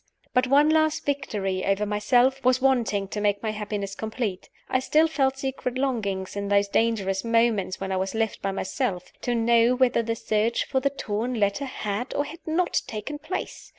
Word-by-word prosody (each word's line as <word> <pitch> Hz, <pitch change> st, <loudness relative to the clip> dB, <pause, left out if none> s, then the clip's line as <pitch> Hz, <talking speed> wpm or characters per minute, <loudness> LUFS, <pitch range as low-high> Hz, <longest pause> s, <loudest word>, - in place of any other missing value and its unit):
But 250 Hz, 0 st, +3 dB
one 285 Hz, +3 st, +5 dB
last 315 Hz, 0 st, +2 dB
victory 205 Hz, -10 st, -2 dB
over 195 Hz, +1 st, +1 dB
myself 245 Hz, +6 st, +2 dB
was 255 Hz, 0 st, +4 dB
wanting 240 Hz, -7 st, +1 dB
to 210 Hz, -, -3 dB
make 205 Hz, 0 st, +1 dB
my 220 Hz, -, 0 dB
happiness 205 Hz, -2 st, -4 dB
complete. 220 Hz, -2 st, -4 dB, 0.2 s
I 255 Hz, -, +1 dB
still 305 Hz, +5 st, +3 dB
felt 270 Hz, -4 st, +1 dB
secret 265 Hz, -2 st, -3 dB
longings, 205 Hz, -9 st, -2 dB
in 200 Hz, 0 st, -3 dB
those 200 Hz, 0 st, +3 dB
dangerous 200 Hz, -3 st, 0 dB
moments 230 Hz, -5 st, +1 dB
when 195 Hz, 0 st, -4 dB
I 190 Hz, -, 0 dB
was 190 Hz, +3 st, -2 dB
left 220 Hz, -1 st, -1 dB
by 195 Hz, -, -1 dB
myself, 190 Hz, -1 st, -3 dB
to 245 Hz, -, -1 dB
know 235 Hz, +1 st, +4 dB
whether 250 Hz, -2 st, +3 dB
the 230 Hz, 0 st, -2 dB
search 220 Hz, +1 st, 0 dB
for 265 Hz, -, 0 dB
the 280 Hz, +2 st, +1 dB
torn 240 Hz, -2 st, -3 dB
letter 200 Hz, +7 st, +1 dB
had 225 Hz, -2 st, -4 dB
or 285 Hz, -, +1 dB
had 330 Hz, +3 st, -9 dB
not 345 Hz, +3 st, +1 dB
taken 225 Hz, +7 st, -5 dB
place. 335 Hz, +5 st, -5 dB
230 Hz, 185 wpm, -25 LUFS, 200-265 Hz, 0.2 s, one